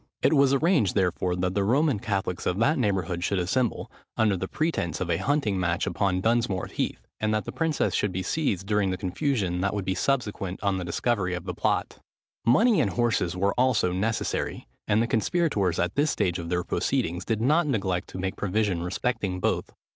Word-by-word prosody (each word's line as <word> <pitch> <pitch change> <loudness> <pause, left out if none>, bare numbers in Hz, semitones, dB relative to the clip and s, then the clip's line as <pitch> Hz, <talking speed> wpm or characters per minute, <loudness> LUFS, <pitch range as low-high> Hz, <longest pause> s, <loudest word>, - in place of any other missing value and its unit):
It - - +4
was 140 -2 +5
arranged, 140 - +2
therefore, 90 -2 +1
that 90 0 -1
the 100 - +1
Roman 135 +3 +2
Catholics 95 -5 -2
of 90 - 0
that 140 +8 +2
neighbourhood 95 -6 0
should 100 - 0
assemble, 105 +7 -1 0.3
under 110 -3 +3
the 95 +1 -3
pretence 155 - -1
of 90 -2 -2
a 85 - +2
hunting 140 -10 0
match 85 -1 0
upon 95 -2 0
Dunsmore 110 -4 +1
Heath, - - -4
and 110 0 0
that 105 -3 -1
the - - -5
princess 160 -3 0
should 105 - +1
be 95 +1 -3
seized 100 - -1
during 105 -1 +1
the 95 - -2
confusion 95 - -1
that 100 +1 0
would 100 -2 -3
be 95 - 0
consequent 100 -4 -1
on 100 -2 +1
the - - -3
discovery 90 +1 -1
of 90 0 -6
the 90 - -3
plot. - - -1 0.5
Money 215 - +5
and 100 - 0
horses 115 -7 0
were 100 +2 +1
also 125 -8 +3
necessary: 105 +5 -2 0.2
and 110 +3 +3
the - - -1
conspirators, 115 - +1
at 90 +1 0
this 145 +2 +2
stage 90 -7 0
of 85 -1 -5
their 90 0 0
proceedings, 85 +1 -1
did 115 -2 -1
not 150 +8 +3
neglect 95 -9 -1
to - - -8
make 95 0 -2
provision 105 -3 0
respecting 95 +1 -2
both. - - -1
100 Hz, 200 wpm, -26 LUFS, 90-120 Hz, 0.5 s, was